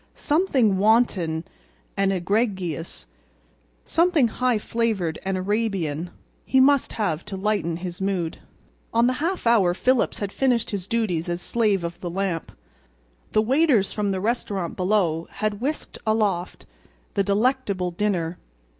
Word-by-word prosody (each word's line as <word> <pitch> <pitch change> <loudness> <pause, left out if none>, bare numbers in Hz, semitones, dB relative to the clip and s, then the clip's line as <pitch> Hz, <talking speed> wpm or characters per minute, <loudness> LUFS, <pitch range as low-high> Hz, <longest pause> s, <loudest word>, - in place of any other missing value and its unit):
Something 270 - +2
wanton 195 -7 +2 0.5
and 195 0 +2
egregious, 190 - -1 0.8
something 330 -7 +3
high 250 +1 +1
flavored 210 -7 -1
and 190 0 -1
Arabian, 185 -5 -1 0.3
he 265 - +2
must 280 +1 +4
have 175 -7 -1
to 200 -2 -6
lighten 190 -5 0
his 175 +1 -6
mood. 185 -4 -1 0.6
On 230 +1 +5
the 255 - +3
half 355 0 -1
hour 200 -7 +4
Phillips 255 +3 +1
had 200 -2 -3
finished 250 -2 +1
his 195 -3 -4
duties 185 -8 -1
as 175 0 -2
slave 210 -2 +1
of 170 0 -5
the 175 - -3
lamp. 180 -2 -2 0.8
The 215 - +4
waiters 260 -4 +3
from 210 -2 -1
the 190 -1 -1
restaurant 200 -4 -2
below 180 -4 +1
had 215 0 -2
whisked 295 +4 -3
aloft 205 -5 0 0.5
the 200 - +2
delectable 200 -3 0
dinner. 175 -3 -1
200 Hz, 135 wpm, -24 LUFS, 180-230 Hz, 0.8 s, On